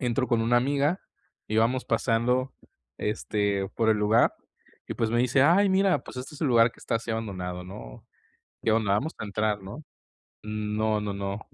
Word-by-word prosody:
Entro 125 0 0
con 115 -2 +2
una 120 +2 +3
amiga, 140 +7 +1 0.5
y 110 - -1
vamos 120 +4 +2
pasando, 125 +2 +1 0.5
este, 100 -2 -1
por 110 -1 +1
el 110 - +4
lugar 105 +3 +3 0.5
y, - - -5
pues, 115 - -1
me 120 - +1
dice: 125 +2 +3
"Ay 185 +7 +5
mira, 190 0 +3
pues, - - -11
este 130 +4 -7
es 150 - -12
el 150 - +2
lugar, 115 -1 +5
que - - -23
está - - -1
así 115 +1 -6
abandonado, 90 -5 -4
¿no? 60 -11 -10 0.6
¿Qué 110 - +2
onda, 110 -3 +2
vamos 140 +11 0
a - - -4
entrar, 105 0 -1
no?". 100 +11 -9 0.6
No, 105 0 -1
no, 105 -1 -3
no. 100 +1 -4
115 Hz, 185 wpm, -27 LUFS, 105-125 Hz, 0.6 s, Ay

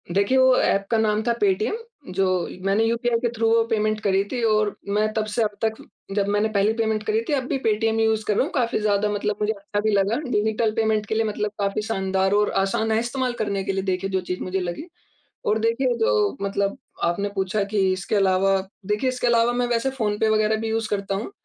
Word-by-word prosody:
देखिए, 200 +6 +3
वो 260 0 +6
ऐप 195 0 +2
का 230 - +3
नाम 215 -1 +1
था 235 +1 +1
पेटीएम, 205 - +1 0.4
जो 195 +1 +2 0.4
मैंने 200 +3 +2
यूपीआई 235 +1 +1
के 240 0 0
थ्रू 225 0 +1
वो 230 0 +4
पेमेंट 215 -1 0
करी 195 -2 +2
थी 250 - -2
और 215 -2 +2
मैं 210 +2 +1
तब 220 -1 0
से 230 - +2
अब 215 - +1
तक 220 -1 +1 0.4
जब 200 -1 +1
मैंने 205 +2 +1
पहली 205 +1 +2
पेमेंट 220 -2 -1
करी 220 +1 +1
थी - - +1
अब 270 -2 +1
भी - - 0
पेटीएम 225 +1 +1
यूज़ 220 -1 +2
कर 210 - +1
रहा - - +3
हूँ, 305 - -4
काफ़ी 245 -4 0
ज़्यादा 210 -1 +1
मतलब 210 0 -1
मुझे 210 +1 +1
अच्छा 205 0 -4
भी 215 +1 +1
लगा। 200 +2 +2
डिजिटल 220 0 +1
पेमेंट 220 -1 +1
के 220 - -3
लिए 225 - +2
मतलब 210 -1 -2
काफ़ी 200 +1 0
शानदार 190 -3 0
और 210 0 +2
आसान 220 +3 0
है 220 - +3
इस्तेमाल 250 +1 -2
करने 200 -2 -1
के - - -1
लिए 195 0 -2
देखिए 190 0 -1
जो 190 -1 0
चीज़ 180 - -2
मुझे 185 +1 -2
लगी 180 - -5 0.6
और 215 - +2
देखिए 230 +3 +1
जो 440 - +2
मतलब 200 0 -1 0.3
आपने 185 +4 0
पूछा 195 +1 0
कि 210 - +2
इसके 190 +3 -3
अलावा 195 0 +3 0.3
देखिए 210 +5 +1
इसके 250 -1 -1
अलावा 235 0 +3
मैं 245 0 0
वैसे 240 +2 0
फ़ोन 215 -5 -1
पे 220 - +2
वगैरह 215 0 +2
भी 225 - -2
यूज़ 225 0 -1
करता 200 -1 -2
हूँ। 210 - -4
215 Hz, 230 wpm, -23 LUFS, 200-225 Hz, 0.6 s, वो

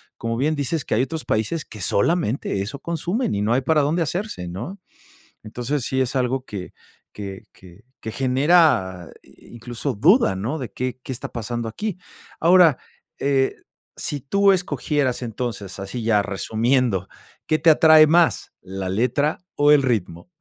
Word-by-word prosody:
como 115 0 -3
bien 155 +4 +1
dices, 145 +1 -2
que - - 0
hay 115 - +2
otros 155 +4 -3
países 110 +9 -1
que 105 - -11
solamente 110 - 0
eso 110 +8 -5
consumen 170 - -2
y 100 - -1
no 105 +3 0
hay 125 - +3
para 150 +3 +2
dónde 160 +5 0
hacerse, 175 - -3
¿no? 120 - -7 0.6
Entonces, 125 +5 -3
sí 130 0 0
es 130 +1 -2
algo 130 +1 0
que 95 -6 -7 0.4
que 100 -2 -8
que 95 +4 -17 0.2
que 110 - -6
genera 130 - +2
incluso 120 +3 -7
duda, 165 - +4
¿no? 120 +11 -3
De, 125 - -6
¿qué 130 0 -4
qué - - -6
está 125 - -5
pasando 120 0 -4
aquí? 205 - -4 0.4
Ahora, 170 -4 +5 0.4
eh, 135 -1 +1 0.4
si 145 -2 -3
tú 200 +8 +3
escogieras 150 -8 -1
entonces, 110 -4 -5
así 100 +5 -5
ya 110 -2 +3
resumiendo, 110 0 0 0.4
¿qué 155 - +2
te 160 +1 +5
atrae 155 0 +7
más, 165 +2 +2
la 95 0 -5
letra 125 +9 0 0.2
o 145 0 +4
el 150 -2 +6
ritmo? 105 - -2
130 Hz, 160 wpm, -22 LUFS, 110-155 Hz, 0.6 s, atrae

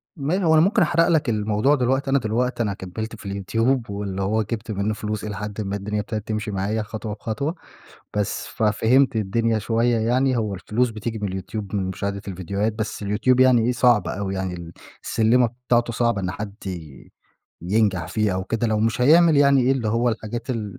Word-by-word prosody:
ما 165 +6 -1
هو 160 -2 +4
أنا 155 - +6
ممكن 205 +6 +3
أحرق 165 -1 +3
لك 160 -6 +2
الموضوع 110 +5 +2
دلوقتي، 135 +1 0
أنا 140 +1 +3
دلوقتي 120 +2 -1
أنا 105 -3 -1
كمِّلت 110 +4 -6
في 110 - -14
اليوتيوب، 115 +6 0
واللي 100 -1 -4
هو 105 +3 +1
جبت 110 +1 -5
منه 100 +1 -1
فلوس 105 0 -4
إلى 105 -1 -4
حدٍ 105 +1 -5
ما 100 -1 -3
الدنيا 105 +1 -3
ابتدت 105 +1 -4
تمشي 110 0 -2
معايا 100 +3 -1
خطوة 105 0 -6
بخطوة، 115 +9 -3 0.6
بس، 105 -2 -2
ففهمت 115 +5 +2
الدنيا 110 +2 +1
شوية 115 +2 +1
يعني، 125 +3 +1
هو 105 -3 -1
الفلوس 115 +6 0
بتيجي 110 0 -5
من 105 - -2
اليوتيوب 95 +2 -5
من 100 - 0
مشاهدة 100 +1 -3
الفيديوهات، 100 +3 -2
بس 110 -1 -4
اليوتيوب 110 +5 +2
يعني 130 -2 +6
إيه 125 - +2
صعب 120 -5 +3
أوي 95 0 -3
يعني، 95 -1 -3
ال 85 -1 -8 0.3
السلِّمة 120 +2 +3 0.2
بتاعته 120 -1 +2
صعبة 115 -3 +1
إن 90 -1 -2
حد 105 0 -6
ي 80 -7 -8 0.5
ينجح 95 -1 +1
فيها 105 -3 0
أو 95 0 -2
كده 115 +4 -1
لو 110 -1 +1
مش 115 +2 0
هيعمل 160 +4 +6
يعني 140 -1 +5
إيه 130 +2 +3
اللي 125 -5 -1
هو 115 +3 +1
الحاجات 115 +2 -4
ال 105 -5 -4
110 Hz, 195 wpm, -23 LUFS, 100-120 Hz, 0.6 s, أنا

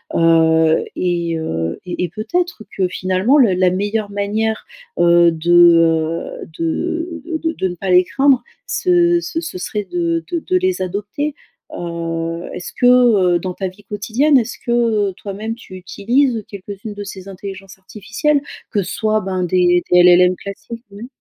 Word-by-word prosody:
heu, 160 -1 +3
et 170 -2 -1
heu, 80 - -3
et 180 0 -3
et - - -7
peut-être 230 - -3
que 185 -2 +1
finalement 185 +9 +1
le 230 -9 +5
la 185 0 +3
meilleure 205 +3 -2
manière, 210 +2 -2 0.3
heu, 170 0 +5
de, 165 +2 -2
heu, 165 -1 +3
de 330 - -3 0.2
de 325 - +1
de 190 - -2
ne 180 - -5
pas 185 +2 -3
les 180 0 +6
craindre 270 +4 +2 0.2
ce 355 -8 +2
ce 350 -2 -4 0.2
serait 210 +3 -3
de 335 - -1
de 340 - 0
de 370 +3 0
les 370 - 0
adopter. 210 +11 -3 0.4
Heu, 165 0 -4
est-ce 180 - -7
que, - - +2 0.5
heu, - - +1
dans 185 0 -4
ta 190 +1 -3
vie 185 +3 -12
quotidienne, 230 +8 +1
est-ce 240 -1 -2
que, 240 - -5 0.4
heu, - - -8
toi-même 210 +3 -5
tu 225 -5 -12
utilises 225 +6 0
quelques-unes 200 +2 -8
de 205 - -7
ces 195 -1 -9
intelligences 195 0 -9
artificielles? 225 +10 -1 0.3
Que 205 - 0
ce - - -6
soit 215 -1 +1
ben 185 -2 -3
des 175 0 +2
des 180 - +6
LLM 180 +1 +6
classiques 230 +4 -9
mmh 205 +4 -9
195 Hz, 165 wpm, -18 LUFS, 175-235 Hz, 0.5 s, les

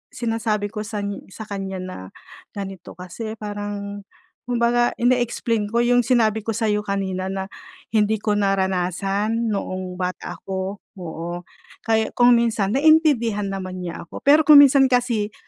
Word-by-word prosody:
sinasabi 220 -3 -1
ko 210 - -4
san 205 -2 -4 0.2
sa 220 - -7
kanya 195 -2 -4
na 185 0 -7 0.6
ganito 195 -3 -7
kasi, 185 +5 -7
parang 205 -1 -6 0.4
kumbaga 240 0 +2
ine-explain 240 -3 +1
ko 235 - +3
yung 245 -1 +3
sinabi 220 -4 +2
ko 225 - -1
sa'yo 210 -2 0
kanina 190 -2 -2
na 190 0 -4 0.4
hindi 215 -1 +1
ko 210 - 0
naranasan 195 +3 0
noong 185 -2 -4
bata 180 0 -4
ako, 190 +1 -4 0.2
oo. 170 +1 -5 0.4
Kaya 220 -1 +1
kung 245 0 +6
minsan 220 -4 0
naintindihan 270 -9 +3
naman 185 -1 -5
niya 170 -1 -6
ako. - - -9
Pero 295 +2 +5
kung 295 -2 +10
minsan 275 -1 +5
kasi 240 -4 0
210 Hz, 140 wpm, -22 LUFS, 195-235 Hz, 0.6 s, kung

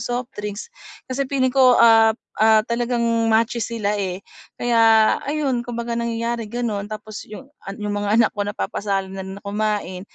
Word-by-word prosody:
softdrinks. 240 - -5 0.3
Kasi 265 +1 -3
feeling 260 -2 +1
ko, 255 -2 +5
ah, 225 -1 +6 0.2
ah, 220 0 +6
talagang 235 +1 -1 0.3
matches 230 0 +1
sila, 210 -3 -1
eh. 190 -2 -3 0.4
Kaya, 240 -1 +1 0.4
ayun, 280 -4 -1
kumbaga 235 0 -5
nangyayari 235 -1 -2
gano'n. 215 -3 -3
Tapos 215 0 -8
'yong 215 +5 -9 0.2
an 195 - -6
'yong 210 -1 -4
mga 205 0 -2
anak 230 -1 +4
ko 205 - -6
napapasali 200 -1 -2
na 195 - -6
rin 190 0 -7
na 200 - -14
kumain. 205 -2 -2
225 Hz, 160 wpm, -21 LUFS, 205-240 Hz, 0.4 s, ah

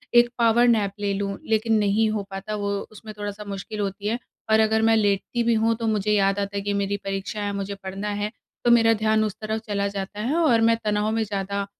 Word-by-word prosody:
एक 240 0 +7
power 235 +1 +4
nap 215 -4 +3
ले 200 -1 0
लूँ। 200 0 -2
लेकिन 220 0 +2
नहीं 210 +1 +2
हो 215 -2 -2
पाता 195 +2 -5
वो 205 -1 -2 0.2
उसमें 215 0 -10
थोड़ा-सा 205 0 -5
मुश्किल 200 +2 -6
होती 200 0 -3
है। 230 +3 0 0.3
और 220 - +5
अगर 220 0 +3
मैं 225 0 +4
लेटती 205 +3 0
भी 235 0 +3
हूँ, 225 +1 +2
तो 225 0 -3
मुझे 210 -1 +1
याद 195 -1 +2
आता 200 0 -3
है - - -1
कि 205 +1 -2
मेरी 200 0 0
परीक्षा 195 +2 -4
है, 205 0 -2
मुझे 200 0 -4
पढ़ना 195 +2 -4
है। 210 - -2 0.3
तो 240 - +5
मेरा 225 -1 +6
ध्यान 220 0 +2
उस 215 -2 -2
तरफ 220 +1 -2
चला 200 -1 0
जाता 200 +1 -5
है 255 +8 0
और 295 -9 +4
मैं 230 0 +4
तनाव 210 0 +1
में 225 0 +1
ज़्यादा 200 -1 -3
210 Hz, 235 wpm, -24 LUFS, 200-220 Hz, 0.3 s, एक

